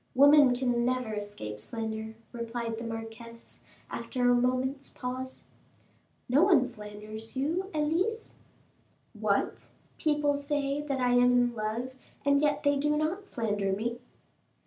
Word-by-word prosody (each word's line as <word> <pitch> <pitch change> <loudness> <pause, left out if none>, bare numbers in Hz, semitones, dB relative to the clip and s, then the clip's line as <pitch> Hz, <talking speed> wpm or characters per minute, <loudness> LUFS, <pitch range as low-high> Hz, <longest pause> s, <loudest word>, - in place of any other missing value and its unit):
"Women 285 -1 +7
can 245 -1 +1
never 250 -2 0
escape 205 - -5
slander," 220 - -5 0.2
replied 235 -1 -4
the - - -5
marquise, 230 +1 -8 0.3
after 245 -2 0
a - - +6
moment's 255 +3 0
pause. 255 +1 -6 0.8
"No 265 +5 +4
one 340 -9 +5
slanders 215 -1 -8
you, 330 +8 -1
Elise." 340 +9 -1 0.8
"What! - - -1 0.3
people 295 -2 +2
say 285 0 -1
that 280 -3 -2
I 250 -1 +2
am 245 0 +5
in 240 -1 -3
love, 225 +4 -3 0.3
and 280 0 +4
yet 295 -1 +1
they 285 -1 +3
do 295 +1 +1
not 345 +7 -1
slander 205 - -1
me!" 235 +4 -2
250 Hz, 130 wpm, -29 LUFS, 225-285 Hz, 0.8 s, Women